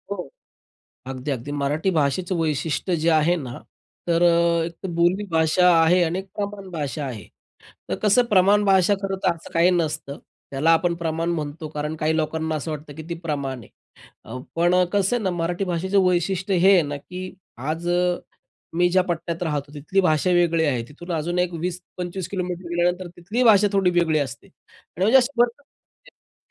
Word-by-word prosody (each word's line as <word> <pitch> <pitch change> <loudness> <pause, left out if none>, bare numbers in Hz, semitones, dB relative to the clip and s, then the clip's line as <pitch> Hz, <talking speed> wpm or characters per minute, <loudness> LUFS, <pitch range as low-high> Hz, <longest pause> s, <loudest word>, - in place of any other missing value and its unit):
हो. 180 -8 -5 0.8
अगदी, 130 +2 -5
अगदी. 135 +1 -4
मराठी 145 +5 0
भाषेचं 170 +3 0
वैशिष्ट्य 160 +2 -1
जे 160 +1 0
आहे 160 +2 +3
ना, 130 -7 -6 0.5
तर 170 0 +2
अ, 170 -1 +3
एक 170 +3 -7
बोली 175 +4 +2
भाषा 160 +3 +3
आहे 175 +3 +4
आणि 170 +2 -1
एक 190 - -6
प्रमाण 200 -1 -5
भाषा 150 -4 -4
आहे. 110 -8 -7 0.6
तर - - -1
कसं 215 +4 +4
प्रमाण 205 0 +4
भाषा 195 0 +4
खरंतर 195 -1 0
असं 170 -1 -13
काही 170 +2 +4
नसतं. 155 -5 -2 0.3
त्याला 140 +4 +1
आपण 170 +1 +2
प्रमाण 165 0 -2
म्हणतो, 155 -1 -4
कारण 150 0 -4
काही 155 +1 0
लोकांना 160 0 -1
असं 155 +1 -4
वाटतं 150 -1 -7
की 160 - -8
ती 170 - -3
प्रमाण 140 -5 -3
आहे. - - -15 0.6
अ, 115 +3 -7 0.2
पण 175 +1 +3
अ, 180 0 +4
कसं 200 +3 +2
आहे 240 - -3
ना, 190 - 0
मराठी 175 +2 -2
भाषेचं 185 +2 0
वैशिष्ट्य 185 +2 0
हे 190 +3 +6
आहे 185 -3 +5
ना, 145 -1 -4
की 185 +6 -8 0.2
आज 155 +6 -3
अ, 175 0 +1 0.6
मी 175 +1 +4
ज्या 185 +1 +4
पट्ट्यात 170 0 -3
राहतो, 145 -3 -3
तिथली 155 +7 0
भाषा 170 -1 +2
वेगळी 170 -2 +3
आहे. 130 -6 0
तिथून 175 +5 -8
अजून 170 +2 -2
एक 180 0 +1
20-25 180 +1 -5
किलोमीटर 180 -2 -4
गेल्यानंतर 175 +1 0
तिथली 205 +8 -2
भाषा 210 -3 +6
थोडी 195 -2 +3
वेगळी 160 -3 +2
असते. 140 +1 -4
आणि 185 -2 -12
म्हणजे 230 +6 +6
असं 265 +2 +1
भरपूर 240 +3 +2 0.8
भेटतात - - -61
170 Hz, 180 wpm, -23 LUFS, 155-185 Hz, 0.8 s, हे